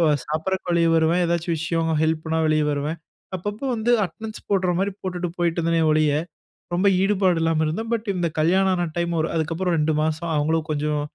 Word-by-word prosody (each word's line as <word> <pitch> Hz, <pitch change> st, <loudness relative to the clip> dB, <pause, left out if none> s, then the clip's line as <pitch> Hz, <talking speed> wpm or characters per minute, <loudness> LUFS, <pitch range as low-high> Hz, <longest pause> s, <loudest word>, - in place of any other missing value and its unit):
எப்ப 165 Hz, -, +4 dB, 0.2 s
சாப்பாட்டுக்கு 175 Hz, +4 st, -2 dB
வெளிய 170 Hz, -1 st, +3 dB
வருவேன். 165 Hz, +3 st, +3 dB
ஏதாச்சும் 170 Hz, 0 st, 0 dB
விஷயம் 165 Hz, 0 st, -1 dB
ஹெல்ப்னா 160 Hz, 0 st, 0 dB
வெளிய 155 Hz, -1 st, +2 dB
வருவேன். 145 Hz, +3 st, -2 dB, 0.4 s
அப்பப்ப 205 Hz, +4 st, -5 dB
வந்து 225 Hz, +2 st, 0 dB
அட்டென்டன்ஸ் 220 Hz, +4 st, -8 dB
போட்ற 185 Hz, -3 st, +2 dB
மாரி 200 Hz, +1 st, 0 dB
போட்டுட்டு 180 Hz, -1 st, -3 dB
போயிட்டு 170 Hz, 0 st, 0 dB
இருந்தேனே! 165 Hz, 0 st, +1 dB
ஒழிய, 155 Hz, -1 st, +3 dB, 0.6 s
ரொம்ப 185 Hz, +3 st, +1 dB, 0.2 s
ஈடுபாடு 190 Hz, -4 st, +2 dB
இல்லாம 165 Hz, -1 st, +1 dB
இருந்தேன். 220 Hz, +9 st, -3 dB
பட் 225 Hz, -1 st, -4 dB
இந்த 175 Hz, -1 st, 0 dB
கல்யாணமான 185 Hz, +1 st, +2 dB
டைம் 170 Hz, 0 st, -1 dB, 0.2 s
அதுக்கப்புறம் 165 Hz, +3 st, -1 dB
2 155 Hz, +1 st, +2 dB
மாசம் 160 Hz, +2 st, -2 dB
அவுங்களும் 160 Hz, +2 st, 0 dB
கொஞ்சம் 150 Hz, 0 st, 0 dB
170 Hz, 165 wpm, -23 LUFS, 160-185 Hz, 0.6 s, எப்ப